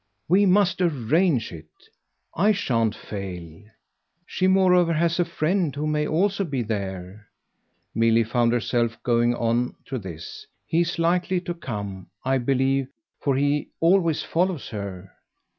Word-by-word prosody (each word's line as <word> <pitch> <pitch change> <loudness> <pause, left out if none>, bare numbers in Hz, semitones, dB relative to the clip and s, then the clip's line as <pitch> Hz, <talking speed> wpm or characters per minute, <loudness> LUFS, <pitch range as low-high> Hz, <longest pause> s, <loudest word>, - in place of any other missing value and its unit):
"We 195 +4 +4
must 185 -2 +3
arrange 150 -2 +1
it 80 -2 -10 0.7
I 205 +6 +4
shan't 115 - 0
fail. 90 -4 -8 0.6
She 185 - 0
moreover 180 -3 +4
has 170 +2 +1
a 175 - +3
friend 170 -1 0
who 145 +1 -2
may 150 0 0
also 195 +5 +1
be 140 -8 -2
there" 100 -1 -5 0.7
Milly 115 +1 +3
found 120 +1 +1
herself 120 -1 0
going 120 0 +2
on 120 +1 0
to 130 - -4
this. 85 -5 -9 0.2
"He's 170 +1 0
likely 175 +2 +1
to 175 -1 -4
come, 105 - -6 0.2
I 135 0 +2
believe, 135 +1 +1 0.3
for 140 -2 0
he 145 +2 0
always 170 -2 +3
follows 175 -3 -1
her." 100 -3 -7
135 Hz, 135 wpm, -24 LUFS, 110-170 Hz, 0.7 s, We